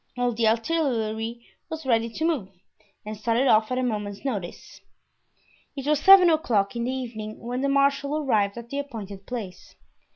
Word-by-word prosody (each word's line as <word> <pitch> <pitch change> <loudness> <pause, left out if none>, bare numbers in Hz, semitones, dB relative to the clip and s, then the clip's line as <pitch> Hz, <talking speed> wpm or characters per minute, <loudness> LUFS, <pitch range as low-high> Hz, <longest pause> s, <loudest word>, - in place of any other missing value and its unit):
All 245 0 +1
the 225 -1 +1
artillery 230 -3 -1 0.2
was 320 -2 -6
ready 230 -2 +2
to 310 +8 -3
move, 285 - -1 0.6
and 215 +1 -5
started 230 +5 +1
off 220 0 +4
at 255 - 0
a 255 - 0
moment's 210 -2 -3
notice. 205 -10 -5 0.9
It 275 -2 -6
was 300 -1 +2
seven 380 -1 +8
o'clock 235 -11 +1
in 235 0 -2
the 255 - -1
evening 225 -5 -6
when 245 +2 -4
the 280 - +1
marshal 280 +1 +2
arrived 215 -8 +1
at 235 0 -9
the 280 - -2
appointed 205 -8 -7
place. 220 -7 -7
235 Hz, 170 wpm, -25 LUFS, 215-280 Hz, 0.9 s, seven